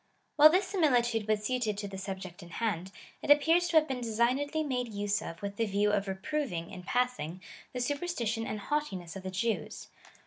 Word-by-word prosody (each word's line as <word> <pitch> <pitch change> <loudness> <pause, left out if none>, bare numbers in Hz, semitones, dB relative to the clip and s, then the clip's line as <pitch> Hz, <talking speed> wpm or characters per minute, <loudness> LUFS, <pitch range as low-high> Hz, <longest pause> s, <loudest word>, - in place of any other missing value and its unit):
While 300 +1 +9
this 370 +4 +2
similitude 240 - +2
was 215 -1 +1
suited 240 -5 0
to 205 0 -4
the 195 - -8
subject 190 -1 -6
in 175 - -11
hand, 190 -2 -2 0.3
it - - -6
appears 325 +4 +5
to 345 - -2
have 310 0 +5
been 260 -2 -3
de 235 - -3
signedly 270 +8 +1
made 250 -2 -1
use 205 0 -1
of 165 -5 -7
with 200 0 -4
the 230 - +2
view 205 +1 +2
of 205 -1 0
reproving, 190 - -3
in 180 - -7
passing, 245 -5 -1 0.3
the - - -6
sujierstition 245 -4 -1
and 215 - -4
haughtiness 200 - -3
of 195 - -6
the 190 - -5
Jews. 210 +4 -2
225 Hz, 200 wpm, -31 LUFS, 195-285 Hz, 0.3 s, While